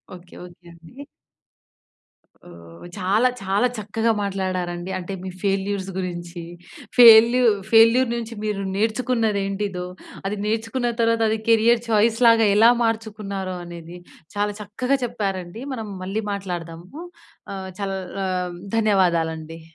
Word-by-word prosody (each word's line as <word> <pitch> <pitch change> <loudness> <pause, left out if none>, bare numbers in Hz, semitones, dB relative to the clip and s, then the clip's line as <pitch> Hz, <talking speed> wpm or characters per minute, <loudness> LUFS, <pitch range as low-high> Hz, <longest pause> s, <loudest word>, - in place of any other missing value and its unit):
Okay. 175 0 -15
Okay 175 0 -17
అండి. 170 - -13 1.5
ఓహ్! 85 - -14
చాలా, 205 +7 +2
చాలా 195 +5 +1
చక్కగా 220 +2 -1
మాట్లాడారండి. 185 -2 -3
అంటే 185 +2 -6
మీ 190 - -5
ఫెయిల్యూర్స్ 195 -1 -1
గురించి, 175 -1 -5 0.6
ఫెయిల్యూ 235 +1 +8 0.3
ఫెయిల్యూర్ 230 +2 +6
నుంచి 230 -1 -5
మీరు 205 -2 -2
నేర్చుకున్నది 220 0 0
ఏంటిదో, 195 -2 -3 0.4
అది 200 +1 -2
నేర్చుకున్న 225 +3 -1
తర్వాత 230 0 +2
అది 220 - 0
కెరియర్ 230 +1 +4
చాయిస్ 225 +1 +3
లాగా 225 -2 +5
ఎలా 225 +3 +7
మార్చుకున్నారో 210 -4 -3
అనేది 170 0 -10 0.4
చాలా 205 0 0
చక్కగా 250 +7 -1
చెప్పారండి. 195 -2 -4
మనం 225 -4 -5 0.2
మళ్ళీ 205 +4 -3
మాట్లాడదాము 180 - -6 0.5
ఆహ్, 190 -1 -6
చల్ 195 -1 -2 0.3
ఆహ్, 180 -1 -2 0.2
ధన్యవాదాలండి. 165 -6 0
200 Hz, 115 wpm, -22 LUFS, 180-225 Hz, 1.5 s, ఫెయిల్యూ